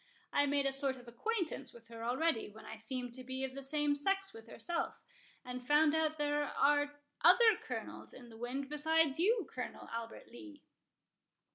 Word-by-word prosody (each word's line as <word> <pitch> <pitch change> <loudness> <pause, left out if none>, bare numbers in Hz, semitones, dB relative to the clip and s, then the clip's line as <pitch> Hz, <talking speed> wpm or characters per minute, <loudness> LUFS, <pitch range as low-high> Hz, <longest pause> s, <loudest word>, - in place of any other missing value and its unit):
I 285 0 +4
made 280 0 +2
a 275 - +2
sort 270 -1 +1
of 245 -1 -14
acquaintance 315 - -2
with 230 -1 -15
her 230 -1 -8
already, 250 +1 +1
when 220 +1 -13
I - - -7
seemed 245 +2 -4
to 255 +1 -7
be 260 +1 -4
of 265 -1 -3
the 275 - -6
same 295 +1 +1
sex 390 +6 0
with 225 0 -12
herself, 285 +9 -2 0.5
and 250 0 -6
found 295 +1 +5
out 315 -1 +1
there 295 0 +1
are 290 +1 +2 0.3
other 440 +7 +7
Colonels - - -6
in 245 -2 -12
the 225 - -12
wind 255 +4 -3
besides 305 0 +2
you, 415 - +3
Colonel 250 - -5
Albert 230 0 -6
Lee." 300 +4 -12
280 Hz, 180 wpm, -35 LUFS, 245-310 Hz, 0.5 s, other